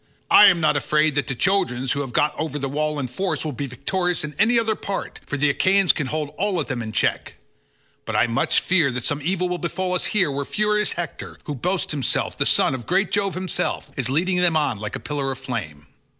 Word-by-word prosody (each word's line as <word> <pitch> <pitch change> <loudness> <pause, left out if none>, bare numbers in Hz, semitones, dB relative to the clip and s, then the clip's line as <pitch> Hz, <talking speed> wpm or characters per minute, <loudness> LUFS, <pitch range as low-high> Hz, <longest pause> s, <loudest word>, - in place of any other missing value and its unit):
I 210 - +9
am 175 -3 +5
not 155 -2 +2
afraid 150 +1 +2
that 145 -2 -1
the 135 - -2
Trojans, 135 -7 0
who 145 - 0
have 135 -3 -5
got 150 +5 +2
over 155 -1 -2
the 135 -1 -3
wall 150 +2 -1
in 140 - -2
force, 160 +5 -2
will 155 - -2
be 140 +2 -4
victorious 175 +8 -1
in 150 0 -5
any 235 +3 +4
other 225 -1 +2
part, 200 -2 -5
for 145 - -3
the 145 +1 +3
Achaeans 190 +4 +4
can 150 -5 -3
hold 150 0 -3
all 195 -2 +1
of 150 - -1
them 125 -1 -3
in 110 -1 -5
check, - - -1 0.7
but - - -4
I - - +4
much 115 -1 +1
fear 170 -6 +2
that 125 -1 -3
some 145 +1 -1
evil 180 +2 0
will 180 0 -3
befall 180 +1 -2
us 180 - +1
here 185 -9 +1
where 140 +1 -2
furious 210 +5 +1
Hector, 175 -1 -6
who 150 - -4
boasts 180 +7 -2
himself 140 -5 -1
the - - +1
son - - +3
of 130 -3 -6
great 190 +3 +1
Jove 200 -3 0
himself, 185 -1 -2
is 130 -4 -2
leading 180 +7 +1
them 175 -3 +3
on 135 -9 0
like 105 +1 -5
a - - -4
pillar 140 -2 -3
of 135 - -5
flame. 105 - -5
155 Hz, 235 wpm, -22 LUFS, 135-185 Hz, 0.7 s, I